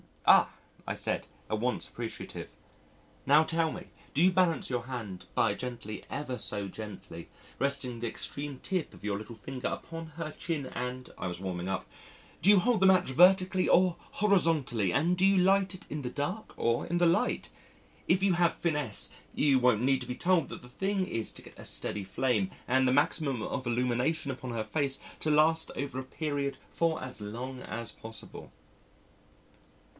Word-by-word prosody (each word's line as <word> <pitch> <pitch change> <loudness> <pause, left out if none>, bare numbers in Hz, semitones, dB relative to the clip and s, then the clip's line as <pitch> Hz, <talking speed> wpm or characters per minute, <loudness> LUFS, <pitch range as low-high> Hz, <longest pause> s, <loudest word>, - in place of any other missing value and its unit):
"Ah!" - - +7 0.4
I - - -1
said - - -1 0.2
at 110 - 0
once 125 +2 0
appreciative, 115 -1 -6 0.7
"now 150 +3 +7
tell 165 0 0
me, - - -8 0.3
do 145 - +3
you 185 - +6
balance 180 -3 +2
your 125 -2 -1
hand 115 -8 -6
by - - +3
gently 120 -4 -6
(ever 130 -4 -4
so 100 -1 -3
gently) 95 -5 -8 0.3
resting 135 -3 -1
the 120 - -2
extreme 140 +4 -3
tip 185 -4 -2
of - - -16
your 105 -1 -1
little 110 +2 -8
finger 125 +4 -5
upon 165 0 -5
her 165 -2 -4
chin, 155 -4 -3
and" 125 +1 -5
(I - - -2
was 90 -1 -4
warming 90 -1 -4
up) 95 -1 -2 0.6
"do 185 - +5
you 205 -2 +8
hold 230 +2 +2
the 190 - +4
match 185 -6 +5
vertically 185 +5 +5
or 180 -1 +4
horizontally, 160 - +2
and 170 - +2
do 185 - +4
you 195 0 +5
light 190 +1 +3
it 185 - -11
in 150 - -3
the 125 - -3
dark 150 - -4
or 115 0 +1
in 175 - 0
the 175 - +4
light? 170 +1 +2 0.6
If 185 +2 +3
you 195 -2 +4
have 175 -1 +3
finesse, 130 - 0 0.2
you 140 -3 +4
won't 125 -3 +3
need 135 0 +3
to - - -6
be 125 - -3
told 175 -1 +2
that - - -8
the 125 - -12
thing 195 +7 -1
is 115 -9 -1
to - - -7
get - - -15
a - - -9
steady 100 -2 -3
flame 105 -2 +1 0.2
and 130 +1 +3
the 125 - +3
maximum 140 -3 +2
of 130 +2 -3
illumination 125 +5 +1
upon 125 -1 -6
her 115 -2 -2
face 140 +1 0 0.2
to 155 - -1
last 160 +2 +4
over 140 -2 -3
a - - -4
period 140 0 -3
for 165 -1 0
as 130 -4 -6
long 125 +5 -5
as 115 0 -4
possible." 110 0 -7
135 Hz, 185 wpm, -30 LUFS, 120-165 Hz, 0.7 s, you